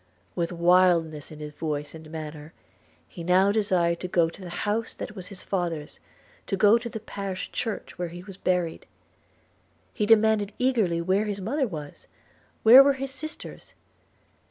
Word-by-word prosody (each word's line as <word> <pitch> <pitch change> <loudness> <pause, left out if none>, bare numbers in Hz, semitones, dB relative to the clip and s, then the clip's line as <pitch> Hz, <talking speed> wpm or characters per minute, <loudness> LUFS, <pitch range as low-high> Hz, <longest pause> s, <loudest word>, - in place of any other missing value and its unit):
With 170 -1 -2
wildness 170 -3 +3
in 155 - -10
his 150 0 -7
voice 150 -1 -4
and 160 -1 -11
manner, 155 -1 -8 0.5
he 170 - -9
now 185 +3 +4
desired 180 -5 +1
to 180 - -4
go 170 -2 +2
to 195 - -14
the 180 - -7 0.2
house 215 +2 -1
that 210 - -7
was 185 -2 -7
his 190 -1 -9
father's, 170 -6 -3 0.5
to 195 - -1
go 210 +4 +5
to 235 0 -6
the 220 - -6
parish 195 -3 -6
church 225 -5 -4
where 175 - -1
he 175 +1 -9
was 195 0 -10
buried. 180 -3 -1 1.1
He 210 -3 -1
demanded 220 -2 +4
eagerly 220 -10 +1
where 190 +5 +1
his 205 -1 -3
mother 260 +8 -1
was? 150 -7 -8 0.6
where 240 +4 +10
were 280 0 +4
his 270 0 -5
sisters? 310 +4 -8
185 Hz, 165 wpm, -26 LUFS, 170-215 Hz, 1.1 s, where